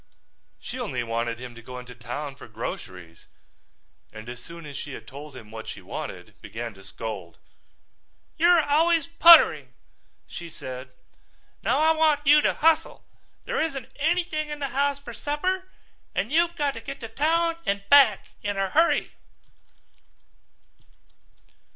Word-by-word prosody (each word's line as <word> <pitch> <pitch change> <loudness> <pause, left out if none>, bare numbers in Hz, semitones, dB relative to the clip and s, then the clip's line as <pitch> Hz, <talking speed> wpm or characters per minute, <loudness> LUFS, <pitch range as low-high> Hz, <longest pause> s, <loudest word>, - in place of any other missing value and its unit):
She - - -7
only - - -2
wanted 115 0 -2
him 125 -1 -8
to 120 - -12
go 125 +2 -9
into 125 0 -9
town 125 +4 -6
for 135 - -12
groceries 90 -6 -8 0.8
and 110 +1 -10
as 120 0 -8
soon 170 -1 -11
as 145 -1 -9
she 145 +1 -6
had 110 - -9
told 140 +3 -10
him 110 -4 -12
what 110 0 -8
she - - -6
wanted 90 +3 -8
began 115 0 -6
to 95 0 -16
scold. 100 -4 -7 1.0
"You're 340 0 +5
always 320 +2 +3
puttering," 335 0 +7 0.5
she 170 -1 -8
said. 130 -3 -8 0.7
"Now 250 +4 +1
I 315 +2 +4
want 310 -2 +2
you 295 +2 +7
to - - +1
hustle. 320 0 +2 0.4
There - - -1
isn't 275 -6 -3
anything 315 0 0
in 295 - -4
the 280 -2 -3
house 280 +2 +1
for 265 -4 -10
supper 365 +8 -2 0.5
and 220 - -1
you've 340 +2 +2
got 290 -3 0
to - - -8
get 275 0 -7
to 225 - -5
town 330 +7 +1
and 200 0 -1
back 285 +1 +6
in 205 -1 -2
a 195 -1 -1
hurry." 330 +2 +3
225 Hz, 150 wpm, -25 LUFS, -, 1.0 s, puttering